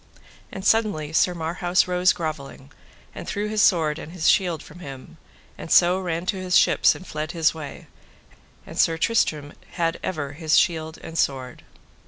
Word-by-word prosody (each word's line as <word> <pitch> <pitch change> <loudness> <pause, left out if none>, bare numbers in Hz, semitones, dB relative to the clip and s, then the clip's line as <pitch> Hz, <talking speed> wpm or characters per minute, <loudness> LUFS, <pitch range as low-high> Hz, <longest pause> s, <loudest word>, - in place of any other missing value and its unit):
And 190 0 -7
suddenly 200 -9 +1
Sir 180 +2 +2
Marhaus 175 +2 0
rose 180 0 +3
grovelling, 145 -4 -6 0.4
and - - -9
threw 205 0 -2
his 215 0 +1
sword 160 -6 +3
and 165 - -9
his 180 -3 -1
shield 175 -4 +2
from 165 - -14
him, 135 -6 -10 0.4
and - - -8
so 180 +2 +5
ran 175 -2 -3
to 190 - -1
his 185 -1 +2
ships - - +4
and 185 - -11
fled 155 -2 -5
his 165 -2 +2
way, 150 -4 -9 0.8
and - - -8
Sir 165 -1 +3
Tristram 155 -8 0 0.2
had 165 -2 -1
ever 145 -6 -4
his 155 +1 +1
shield 160 -2 +1
and - - -10
his 165 - -4
sword. 130 -2 -2
165 Hz, 175 wpm, -23 LUFS, 155-180 Hz, 0.8 s, so